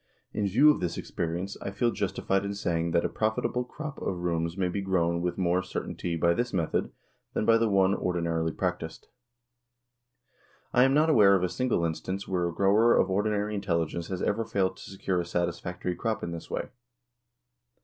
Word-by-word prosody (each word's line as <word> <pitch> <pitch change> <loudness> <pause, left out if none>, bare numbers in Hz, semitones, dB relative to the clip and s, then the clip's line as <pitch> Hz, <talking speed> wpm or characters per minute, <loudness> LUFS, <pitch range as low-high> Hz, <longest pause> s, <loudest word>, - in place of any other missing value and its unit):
In 105 -1 0
view 135 +10 +6
of - - -1
the 90 - 0
experience 85 +3 -3
I - - -3
feel 115 +4 +1
justified 95 -1 -1
in 100 0 -3
saying 85 -4 -1
that 85 - +2
a - - +3
profitable 110 +3 -1
crop 150 +3 -7
of 95 - -2
'rooms 85 0 -1
may 95 -2 +1
be 100 +3 -2
grown 85 -3 +1
with 90 0 -2
more 90 0 +2
certainty 90 -2 -4
by 85 +1 +3
this 120 +6 -2
method 85 -4 0 0.4
than - - 0
by 115 0 +5
the 115 -1 +2
one 95 -1 +4
ordinarily 85 -3 -1
practiced. 90 -3 -4 1.6
I 125 +1 +6
am 135 +1 +3
not 155 +2 +4
aware 100 -8 +6
of 90 - +1
a 90 - +1
single 125 -8 0
instance 95 +4 -3
where 90 -2 0
a - - -2
grower 100 +7 +4
of - - +2
ordinary 105 +1 0
intelligence 85 -4 -1
has 95 -2 -4
ever 110 +2 +1
failed 100 -4 0
to - - -10
secure 95 -1 -1
a - - 0
satisfactory 85 +1 -2
crop 110 +1 -2
in 85 - -3
this 85 -1 -7
way. - - -3
95 Hz, 190 wpm, -28 LUFS, 85-105 Hz, 1.6 s, view